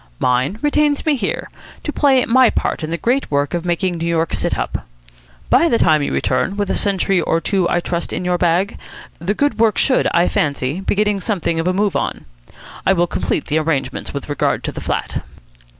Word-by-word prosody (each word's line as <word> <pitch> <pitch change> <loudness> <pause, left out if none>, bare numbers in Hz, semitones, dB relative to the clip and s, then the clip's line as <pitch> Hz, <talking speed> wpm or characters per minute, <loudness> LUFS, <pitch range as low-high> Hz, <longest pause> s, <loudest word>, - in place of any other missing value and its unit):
Mine 125 - +1
retains 295 0 +2
me 310 -2 +3
here, 215 -7 -3 0.3
to 295 - -3
play 270 -3 +3
my 255 +1 +5
part - - -2
in 155 - -3
the 170 - -2
great 250 +8 0
work 145 +2 0
of 170 -1 -1
making 175 0 -1
New 165 - -2
York 165 -1 0
sit - - -1
up. - - -4 0.6
By 335 - +5
the 235 - +3
time 155 -6 +3
you 145 - -1
return, 200 - 0
with 205 -2 -1
a - - +1
century 195 -2 +1
or 165 - +1
two, 185 0 0
I 175 - +1
trust, 170 0 -3
in 180 - -3
your 180 0 +1
bag, 180 +5 +1 0.4
the 185 +6 -1
good 285 -5 0
work 225 -2 +3
should, 260 - +3
I 170 +1 +3
fancy, 140 +1 -1
be 195 - -1
getting 210 -1 +1
something 175 -5 -1
of 165 - -1
a - - +3
move 200 +1 0
on. - - -2 0.6
I 190 - +4
will 175 -2 +2
complete 170 - -2
the 155 +1 +1
arrangements 140 -5 -2
with 140 - -6
regard 145 -1 0
to - - -2
the - - -7
flat." - - -3
180 Hz, 215 wpm, -18 LUFS, 165-210 Hz, 0.6 s, my